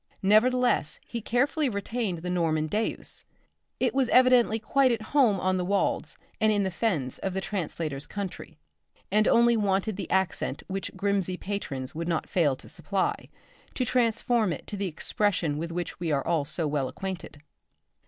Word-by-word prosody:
Nevertheless 220 -5 +3
he 235 - -5
carefully 270 +6 +1
retained 200 -4 -3
the 180 - -3
Norman 160 -3 +1
deus. 210 +8 -2 0.6
It - - +1
was 265 -3 +2
evidently 250 -3 +5
quite 260 +4 +2
at 225 -2 -1
home 240 -9 +4
on 185 +1 +1
the 180 - -1
wolds 200 +2 0 0.2
and 220 -1 +4
in 205 -1 +2
the 190 - -1
fens 170 - -1
of 190 -1 -3
the - - +1
translator's 160 -7 -3
country, 190 -5 -6 0.5
and 215 +2 +3
only 235 0 +5
wanted 200 -1 0
the 200 - -5
accent 190 -1 0
which 195 0 -3
Grimsby 195 -2 0
patrons 140 -11 -4
would 165 +2 -4
not 165 -2 -1
fail 160 -8 +2
to - - -14
supply, 195 -2 -2 0.5
to 255 - 0
transform 235 -3 +2
it 160 - -5
to - - -5
the 200 -1 -2
expression 175 -2 0
with 170 +1 -4
which 175 0 -4
we 170 -2 -1
are 145 +2 +1
so 160 0 0
well 145 -3 0
acquainted. 185 -4 -6
195 Hz, 165 wpm, -27 LUFS, 170-220 Hz, 0.6 s, evidently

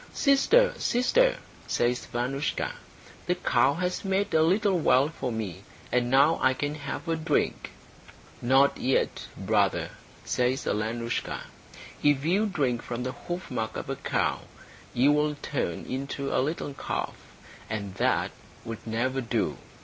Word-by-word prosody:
"Sister, 445 - +4
sister," 485 - +3 0.3
says 120 +1 0
Vanoushka, 130 +4 -2 0.6
"the - - +2
cow 140 +2 +2
has 180 +1 -2
made 195 +1 0
a 160 - +5
little 190 +3 +3
well 140 -2 +4
for 135 -5 -4
me, 110 -6 -4 0.3
and 120 0 +2
now 140 +5 +5
I 130 0 +4
can 145 +2 -2
have 150 +3 -6
a 165 - +1
drink." 160 -1 0 0.7
"Not 135 +3 +4
yet, 130 - 0
brother," - - +1 0.3
says 125 +2 0
Alenoushka. 115 +3 -2 0.6
"If 145 -1 +3
you 195 +6 +3
drink 135 - 0
from 120 0 -4
the 130 - -2
hoofmark 130 -11 -4
of - - -4
a - - -1
cow, - - 0 0.6
you 130 +4 +5
will 150 0 +2
turn 135 - -3
into 140 +1 -3
a - - +3
little 145 0 -2
calf, - - -3 0.6
and 100 -3 -4
that - - +1 0.3
would 115 0 -7
never 130 +4 0
do. 115 - -1
135 Hz, 140 wpm, -27 LUFS, 120-165 Hz, 0.7 s, a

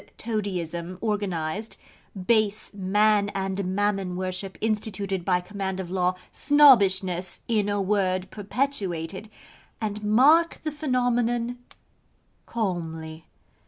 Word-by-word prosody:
Toadyism, 185 -5 -3
organised: 205 -2 -2 0.5
base 215 -2 +1
Man 205 +1 +2
and 190 -1 -2
Mammon 195 -3 0
worship, 185 +1 -4
instituted 205 -3 -2
by 180 -1 +2
command 190 0 -4
of 180 -2 -5
law: 180 -1 +1 0.2
Snobbishness, 195 -11 +4
in 210 -3 +1
a 205 0 0
word, 190 -2 0
perpetuated, 205 - -3 0.5
and 210 -1 -4
mark 285 +11 +4
the 310 - -2
phenomenon 245 -4 0 0.9
calmly. 165 -6 -4
200 Hz, 95 wpm, -25 LUFS, 185-220 Hz, 0.9 s, Snobbishness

